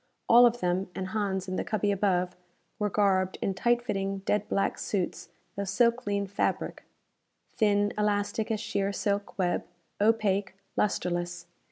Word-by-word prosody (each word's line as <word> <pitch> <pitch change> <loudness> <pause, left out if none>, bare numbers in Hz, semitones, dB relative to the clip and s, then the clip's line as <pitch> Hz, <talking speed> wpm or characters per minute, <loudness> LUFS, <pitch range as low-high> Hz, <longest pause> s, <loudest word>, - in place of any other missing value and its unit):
All 240 +1 +8
of 240 +1 -2
them, 180 +2 0
and 185 0 -3
Hans 195 -3 -1
in 185 0 -3
the - - 0
cubby 205 -1 0
above, 185 -2 +1 0.4
were 210 -1 +1
garbed 190 -2 +2
in 195 - -1
tight 240 +5 +1
fitting 195 -3 -2
dead 210 0 0
black 195 - 0
suits 185 -4 -2 0.3
of 200 0 -3
silklene 205 -1 +1
fabric. 195 - -1 0.7
Thin, 205 -1 +2
elastic 210 +1 0
as 220 -2 0
sheer 200 -2 -1
silk 200 0 -2
web, 180 -2 +1 0.4
opaque, 205 -3 +2 0.2
lustreless. 175 -3 -1
200 Hz, 145 wpm, -28 LUFS, 190-210 Hz, 0.7 s, All